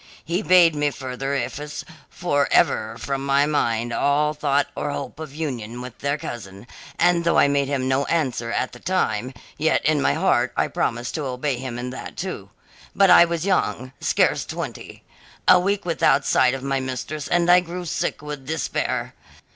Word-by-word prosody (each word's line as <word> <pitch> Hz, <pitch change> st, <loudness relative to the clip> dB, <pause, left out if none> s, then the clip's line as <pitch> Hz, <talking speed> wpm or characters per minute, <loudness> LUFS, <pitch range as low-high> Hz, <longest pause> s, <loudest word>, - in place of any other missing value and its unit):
He 175 Hz, +4 st, -1 dB
bade 180 Hz, -5 st, +5 dB
me 150 Hz, -1 st, +1 dB
further 135 Hz, 0 st, -4 dB
efface 145 Hz, +4 st, -4 dB, 0.2 s
for 145 Hz, -5 st, 0 dB
ever 110 Hz, +1 st, +2 dB
from 135 Hz, +1 st, -3 dB
my 140 Hz, +1 st, +3 dB
mind 120 Hz, -5 st, 0 dB
all 150 Hz, +2 st, +2 dB
thought 145 Hz, -2 st, +1 dB
or -, -, -3 dB
hope 145 Hz, -, -5 dB
of 155 Hz, -3 st, -8 dB
union 120 Hz, -7 st, -4 dB
with 125 Hz, -1 st, -9 dB
their 140 Hz, +1 st, -1 dB
cousin, 100 Hz, -7 st, -8 dB, 0.3 s
and 175 Hz, -1 st, +3 dB
though 170 Hz, -, +2 dB
I -, -, +6 dB
made 140 Hz, -1 st, +1 dB
him 135 Hz, -2 st, -1 dB
no 135 Hz, +1 st, +1 dB
answer 130 Hz, -8 st, -1 dB
at 130 Hz, -, -1 dB
the 120 Hz, -, -12 dB
time, 125 Hz, -, -1 dB, 0.3 s
yet 160 Hz, +1 st, +1 dB
in 150 Hz, -1 st, +3 dB
my -, -, +2 dB
heart -, -, +2 dB
I -, -, +1 dB
promised 120 Hz, 0 st, -2 dB
to 150 Hz, -, -3 dB
obey 130 Hz, +1 st, -2 dB
him 130 Hz, -2 st, -5 dB
in 125 Hz, +1 st, -4 dB
that, 130 Hz, -, -8 dB
too. -, -, -5 dB, 0.5 s
But 195 Hz, -1 st, +5 dB
I 170 Hz, -, +9 dB
was 170 Hz, 0 st, -3 dB
young 130 Hz, -9 st, 0 dB
scarce -, -, +2 dB
twenty. -, -, -7 dB, 0.4 s
A -, -, +8 dB
week 195 Hz, +1 st, -1 dB
without 160 Hz, -4 st, +2 dB
sight 130 Hz, 0 st, +3 dB
of 135 Hz, -, -7 dB
my 135 Hz, 0 st, 0 dB
mistress 130 Hz, +3 st, -4 dB
and 175 Hz, 0 st, +2 dB
I 180 Hz, +1 st, +7 dB
grew 180 Hz, 0 st, -6 dB
sick 155 Hz, -, -2 dB
with 145 Hz, -3 st, -7 dB
despair. 155 Hz, -3 st, -2 dB
140 Hz, 185 wpm, -23 LUFS, 130-160 Hz, 0.5 s, I